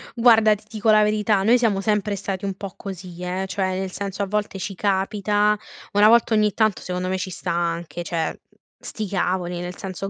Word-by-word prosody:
Guarda, 225 Hz, -3 st, +5 dB
ti 205 Hz, -, -16 dB
dico 220 Hz, -1 st, +1 dB
la 215 Hz, 0 st, +6 dB
verità, 210 Hz, -1 st, +2 dB
noi 235 Hz, +4 st, +5 dB
siamo 210 Hz, -5 st, +1 dB
sempre 210 Hz, -1 st, 0 dB
stati 195 Hz, 0 st, -4 dB
un 195 Hz, -1 st, -3 dB
po' 195 Hz, -1 st, -7 dB
così, 180 Hz, -2 st, -8 dB
eh, 185 Hz, +2 st, -2 dB
cioè 185 Hz, -1 st, -1 dB
nel 190 Hz, -1 st, -3 dB
senso, 200 Hz, +1 st, -4 dB
a -, -, -3 dB
volte 205 Hz, -1 st, -2 dB
ci 195 Hz, +2 st, -4 dB
capita 205 Hz, +2 st, +1 dB, 0.4 s
una 205 Hz, +1 st, +6 dB
volta 235 Hz, 0 st, +5 dB
ogni 210 Hz, -1 st, +3 dB
tanto, 215 Hz, -3 st, +1 dB
secondo 180 Hz, 0 st, -3 dB
me, 190 Hz, -, 0 dB
ci 185 Hz, 0 st, -4 dB
sta 180 Hz, 0 st, -4 dB
anche, 170 Hz, 0 st, -2 dB
cioè, 165 Hz, -2 st, -1 dB
uhm, -, -, -15 dB, 0.2 s
sti 215 Hz, -2 st, -5 dB
cavoli, 180 Hz, -2 st, -1 dB
nel 180 Hz, 0 st, -6 dB
senso, 195 Hz, +1 st, -5 dB
195 Hz, 210 wpm, -23 LUFS, 185-210 Hz, 0.4 s, la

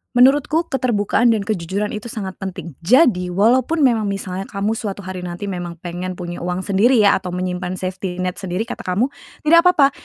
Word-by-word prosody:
Menurutku 285 Hz, +6 st, +4 dB
keterbukaan 235 Hz, -2 st, +2 dB
dan 205 Hz, -, -2 dB
kejujuran 200 Hz, 0 st, -2 dB
itu 215 Hz, +2 st, -6 dB
sangat 200 Hz, -5 st, -6 dB
penting. 180 Hz, -3 st, -6 dB
Jadi, 200 Hz, -, +4 dB
walaupun 245 Hz, -, +2 dB
memang 230 Hz, -5 st, +3 dB
misalnya 195 Hz, -1 st, -4 dB
kamu 200 Hz, +2 st, -2 dB
suatu 205 Hz, -3 st, -4 dB
hari 185 Hz, 0 st, -6 dB
nanti 180 Hz, +3 st, -5 dB
memang 175 Hz, -2 st, -5 dB
pengen 180 Hz, +1 st, -4 dB
punya 175 Hz, -1 st, -6 dB
uang 180 Hz, +1 st, -3 dB
sendiri 210 Hz, +7 st, +3 dB
ya 205 Hz, -4 st, +5 dB
atau 185 Hz, -, -8 dB
menyimpan 180 Hz, 0 st, -3 dB
safety 185 Hz, 0 st, -4 dB
net 180 Hz, 0 st, -3 dB
sendiri 190 Hz, +1 st, -2 dB
kata 230 Hz, -, -8 dB
kamu, 220 Hz, +10 st, +1 dB, 0.3 s
tidak 335 Hz, +3 st, +6 dB
papa. 285 Hz, -6 st, +5 dB
200 Hz, 180 wpm, -20 LUFS, 180-235 Hz, 0.3 s, tidak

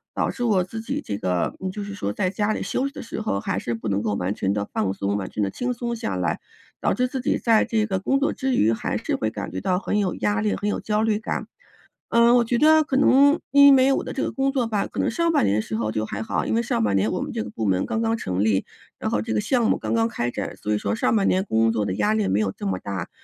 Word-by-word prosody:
导 -, -, 0 dB
致 245 Hz, -, -5 dB
我 205 Hz, -6 st, +3 dB
自 220 Hz, +5 st, -7 dB
己 225 Hz, -, -3 dB
这 100 Hz, -1 st, -4 dB
个， 90 Hz, -1 st, -1 dB
嗯， 190 Hz, -, -3 dB
就 205 Hz, +2 st, -5 dB
是 200 Hz, 0 st, -6 dB
说 145 Hz, -, -3 dB
在 185 Hz, -, -1 dB
家 205 Hz, +2 st, 0 dB
里 -, -, -3 dB
休 270 Hz, -, -1 dB
息 275 Hz, -, -9 dB
的 -, -, -7 dB
时 225 Hz, -, -5 dB
候 215 Hz, -, -1 dB
还 95 Hz, -, -2 dB
是 115 Hz, +3 st, -3 dB
不 115 Hz, 0 st, -6 dB
能 100 Hz, 0 st, 0 dB
够 105 Hz, -2 st, -1 dB
完 90 Hz, +1 st, -1 dB
全 95 Hz, -2 st, -1 dB
地 100 Hz, 0 st, -2 dB
放 95 Hz, -3 st, 0 dB
松， 100 Hz, +1 st, -1 dB
完 100 Hz, -2 st, -3 dB
全 105 Hz, -, -2 dB
地 100 Hz, -, -1 dB
轻 250 Hz, 0 st, -2 dB
松 235 Hz, 0 st, -3 dB
下 105 Hz, -, -3 dB
来， 90 Hz, -3 st, -1 dB, 0.4 s
导 -, -, +1 dB
致 250 Hz, +4 st, +1 dB
自 260 Hz, +1 st, -4 dB
己 -, -, +1 dB
在 225 Hz, -2 st, +3 dB
这 220 Hz, -2 st, +1 dB
个 190 Hz, -3 st, -1 dB
工 270 Hz, +8 st, +1 dB
作 280 Hz, -, +1 dB
之 265 Hz, -2 st, -1 dB
余， 110 Hz, +2 st, +3 dB
还 -, -, -2 dB
是 -, -, -2 dB
会 110 Hz, -, -1 dB
感 105 Hz, -4 st, -6 dB
觉 95 Hz, +2 st, -4 dB
到 180 Hz, -, +1 dB
很 210 Hz, +2 st, -1 dB
有 190 Hz, -4 st, 0 dB
压 105 Hz, 0 st, 0 dB
力， 105 Hz, -3 st, 0 dB
很 205 Hz, -, -3 dB
有 205 Hz, -, -1 dB
焦 210 Hz, 0 st, 0 dB
虑 215 Hz, -2 st, +1 dB
感。 215 Hz, -, -3 dB, 0.6 s
嗯， 235 Hz, +1 st, +5 dB
我 240 Hz, -, +5 dB
觉 235 Hz, +1 st, 0 dB
得 315 Hz, +1 st, +6 dB
可 285 Hz, -, -3 dB
能 280 Hz, +3 st, +5 dB
因 280 Hz, 0 st, +8 dB
为 265 Hz, +1 st, +4 dB
我 -, -, +1 dB
的 -, -, -6 dB
这 270 Hz, -, -2 dB
个 -, -, -2 dB
工 270 Hz, 0 st, 0 dB
作 260 Hz, -4 st, 0 dB
吧， 210 Hz, -3 st, 0 dB
可 -, -, -7 dB
能 -, -, +1 dB
上 335 Hz, +7 st, +1 dB
半 -, -, +3 dB
年 100 Hz, -, +2 dB
的 110 Hz, -, +1 dB
时 110 Hz, -, -5 dB
候 110 Hz, -1 st, -1 dB
就 110 Hz, 0 st, -2 dB
还 110 Hz, 0 st, -5 dB
好， 110 Hz, -, -2 dB
因 -, -, -1 dB
为 230 Hz, -, +2 dB
上 235 Hz, -, -1 dB
半 100 Hz, -2 st, +1 dB
年 100 Hz, +3 st, +1 dB
我 -, -, -2 dB
们 -, -, -4 dB
这 -, -, -2 dB
个 105 Hz, -, -8 dB
部 110 Hz, +1 st, -4 dB
门 95 Hz, -2 st, +2 dB
刚 225 Hz, -, -2 dB
刚 225 Hz, 0 st, +1 dB
成 95 Hz, -, -2 dB
立， 105 Hz, -3 st, +2 dB, 0.4 s
然 -, -, -2 dB
后 105 Hz, -, 0 dB
这 110 Hz, -, -3 dB
个 105 Hz, -, +1 dB
项 240 Hz, -, +1 dB
目 -, -, +3 dB
刚 -, -, -2 dB
刚 225 Hz, 0 st, +2 dB
开 120 Hz, -, -2 dB
展， -, -, -5 dB
所 105 Hz, -, -4 dB
以 -, -, +2 dB
说 100 Hz, -1 st, -2 dB
上 -, -, +1 dB
半 200 Hz, -3 st, +2 dB
年 185 Hz, +1 st, +2 dB
工 115 Hz, -, +2 dB
作 110 Hz, -2 st, 0 dB
的 95 Hz, -2 st, -2 dB
压 105 Hz, +1 st, +1 dB
力 110 Hz, -3 st, +1 dB
没 95 Hz, +2 st, +1 dB
有 105 Hz, -3 st, 0 dB
这 -, -, -5 dB
么 95 Hz, -1 st, -1 dB
大， 95 Hz, -2 st, -5 dB
180 Hz, 335 characters per minute, -23 LUFS, -, 0.6 s, 因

